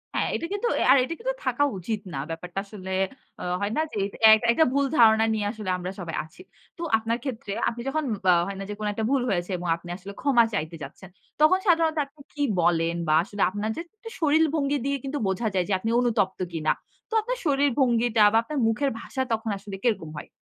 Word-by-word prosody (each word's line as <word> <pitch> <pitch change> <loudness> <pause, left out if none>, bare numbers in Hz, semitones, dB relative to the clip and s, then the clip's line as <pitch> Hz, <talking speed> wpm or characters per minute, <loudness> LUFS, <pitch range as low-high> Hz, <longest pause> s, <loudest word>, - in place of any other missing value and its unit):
হ্যাঁ, - - +1
এটা - - -3
কিন্তু 410 +4 -1
অ্যা - - +1
আর 275 - +7
এটা 275 +6 -3
কিন্তু - - -1
থাকা 255 +3 +1
উচিত 210 +4 -3
না। 135 - -3
ব্যাপারটা 175 +3 -5
আসলে 195 -2 -8 0.5
আ - - -5 0.2
হয় 205 - -1
না - - +3
যে, - - -6 0.4
এক 220 - +5
একটা 315 +7 +4
ভুল 280 0 +2
ধারণা 220 -1 +6
নিয়ে 210 -2 -1
আসলে 215 -4 -6
আমরা 180 +1 -5
সবাই 170 -3 -5
আছি। 160 - -16 0.4
তো - - -9 0.2
আপনার 225 +1 -1
ক্ষেত্রে, 225 -7 -4 0.2
আপনি 235 0 -7
যখন 310 +3 -1 0.2
বা 180 - +6
হয় 195 0 -5
না - - -4
যে - - -3
কোনো 210 -1 -1
একটা 220 +1 -2
ভুল 275 - +3
হয়েছে 180 -1 -1
এবং 175 0 -5
আপনি 175 - -13
আসলে 195 +2 -9
ক্ষমা 255 -4 +4
চাইতে 165 -4 -2
যাচ্ছেন, 165 +7 -10 0.3
তখন 370 +5 +6
সাধারণত 325 -2 +3
আপনি 285 +1 -19
কি 290 - -5 0.2
বলেন 165 0 +2
বা 155 - +3
আসলে 200 +2 -6
আপনার 205 +2 -3
যে - - -4 0.2
একটু 455 +1 -10
শরীর 315 +1 +4
ভঙ্গি 285 -1 +1
দিয়ে 280 0 0
কিন্তু 275 +2 -3
বোঝা 190 +4 -1
যায় 180 -1 +2
যে, - - +2
আপনি 225 - -2
অনুতপ্ত 220 -6 +1
কিনা? 155 -1 +1 0.4
তো - - -8
আপনার - - -3
শরীর 285 -1 +3
ভঙ্গিটা 235 -3 +3
বা - - +5
আপনার 290 +4 -3
মুখের 255 +5 +1
ভাষা 265 - -4
তখন 225 0 -2
আসলে 195 0 -8
কিরকম 215 -10 0
হয়? - - -8
225 Hz, 225 wpm, -25 LUFS, 190-280 Hz, 0.5 s, আর